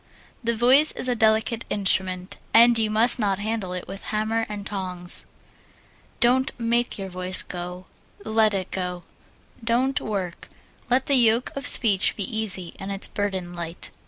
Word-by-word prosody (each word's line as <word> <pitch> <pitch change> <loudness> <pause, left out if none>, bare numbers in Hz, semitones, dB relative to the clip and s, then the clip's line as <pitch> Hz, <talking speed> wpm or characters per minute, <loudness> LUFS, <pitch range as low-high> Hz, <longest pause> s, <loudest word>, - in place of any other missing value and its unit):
The 235 0 0
voice 260 +7 +5
is - - -4
a 250 - +1
delicate 220 0 +1
instrument, 185 -2 -1 0.2
and 235 0 +6
you 220 -1 0
must 225 +4 +4
not 200 -3 0
handle 210 -2 -4
it 180 -1 -6
with 195 +1 -7
hammer 220 +1 -1
and 205 -1 -6
tongs. 180 -4 -3 0.9
Don't 255 +2 +1
make 235 +1 0
your 195 -1 -6
voice 185 0 +1
go 180 +1 -7 0.4
let 220 -1 +2
it 190 -1 -4
go. 180 -2 -4 0.6
Don't 250 +4 0
work. 190 -5 -5 0.4
Let 255 +2 +2
the 285 - 0
yoke 235 -1 +3
of 275 - -2
speech 205 -5 +5
be 205 - -3
easy 195 -5 +3
and 195 +1 -6
its 195 0 -2
burden 190 -3 -4
light. 170 -1 -7
215 Hz, 160 wpm, -23 LUFS, 185-230 Hz, 0.9 s, and